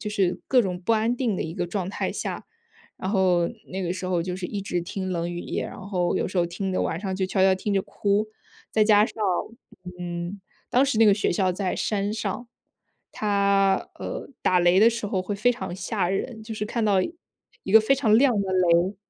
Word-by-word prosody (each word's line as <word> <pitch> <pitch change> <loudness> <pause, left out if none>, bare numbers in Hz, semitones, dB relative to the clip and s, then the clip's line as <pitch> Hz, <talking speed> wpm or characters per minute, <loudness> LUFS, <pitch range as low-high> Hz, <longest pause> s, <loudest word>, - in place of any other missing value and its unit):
就 210 - -4
是 190 -3 0
各 255 -2 +5
种 180 -2 -3
不 225 +5 +1
安 225 +3 +1
定 235 -7 0
的 - - -1
一 160 - -5
个 175 -2 -2
状 185 0 -3
态 - - -2
下。 - - -5 0.5
然 190 - -4
后 180 -4 +3 0.3
那 190 - -3
个 175 -1 -1
时 185 0 -5
候 175 -2 0
就 180 0 -4
是 180 -1 -4
一 200 -2 -4
直 180 -3 -2
听 185 +2 -5
《冷 170 0 -2
雨 175 0 -4
夜》， - - -3
然 - - -10
后 185 -3 -1
有 - - 0
时 185 0 -2
候 170 - +3
听 190 +2 -4
得 - - 0
晚 165 - -2
上 190 -1 -3
就 190 0 -1
悄 190 0 +1
悄 190 0 +5
听 200 +2 -2
着 195 - +2
哭。 205 +2 0 0.4
再 220 - +3
加 210 -1 +6
上， - - -7 0.8
嗯， 175 +2 -5 0.3
当 255 +3 +4
时 275 -4 0
那 225 - +7
个 205 - +7
学 205 - 0
校 185 0 +1
在 185 0 -2
山 205 -1 -1
上， 235 +2 -4 0.6
它， 200 -2 +2
呃， - - -6
打 180 -1 +3
雷 175 +2 +4
的 225 - +8
时 230 -2 -4
候 195 -3 -1
会 205 +2 -3
非 245 +5 +2
常 235 -7 -6
吓 190 -1 -1
人， 220 +4 -3
就 220 0 -6
是 210 - -3
看 230 +2 -2
到 205 -2 +3 0.7
一 190 - -4
个 220 - +10
非 270 +6 +3
常 220 -6 +3
亮 260 +1 +5
的 190 -1 -2
雷。 180 +1 +3
195 Hz, 245 characters per minute, -25 LUFS, 180-215 Hz, 0.8 s, 个